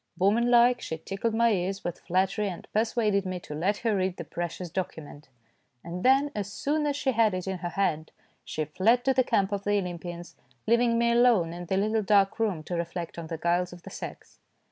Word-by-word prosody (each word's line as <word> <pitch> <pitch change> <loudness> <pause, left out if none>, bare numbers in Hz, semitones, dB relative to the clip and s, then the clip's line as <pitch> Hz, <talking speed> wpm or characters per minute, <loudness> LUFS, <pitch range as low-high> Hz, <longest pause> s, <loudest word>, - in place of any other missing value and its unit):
Woman 215 +6 +3
like, 245 0 +5
she 160 - -4
tickled 195 +7 -3
my 235 0 +4
ears 195 0 -1
with 175 - -4
flat 185 +2 +1
tery, 210 +1 -2
and 180 - -8
persuaded 215 -2 +1
me 185 -1 -4
to 150 - -8
let 185 +7 0
her 220 -2 +3
read 185 -1 -1
the - - -5
precious 175 0 -5
document; 155 -6 -6 0.5
and 170 +2 -6
then, 270 +3 +4
as 200 -1 -4
soon 300 +6 -1
as 285 - 0
she 280 -2 0
had 220 -4 +3
it 185 - -4
in 190 -1 -3
her 175 - -3
hand, 160 -4 -1 0.3
she 155 - -3
fled 225 - +2
to 265 - +4
the 255 0 +3
camp 200 -4 +1
of 200 -1 -2
the 205 0 +2
Olympians, 175 -2 -5 0.3
leaving 235 +1 +3
me 235 0 +3
alone 235 -9 +4
in 175 0 -7
the 190 - 0
little 215 +2 +1
dark 200 0 +3
room 200 -8 0
to 175 - -4
reflect 170 0 -4
on 165 - -6
the 165 - -4
guiles 175 +2 0
of 175 -1 -13
the - - -10
sex. - - -9
195 Hz, 220 wpm, -27 LUFS, 175-230 Hz, 0.5 s, like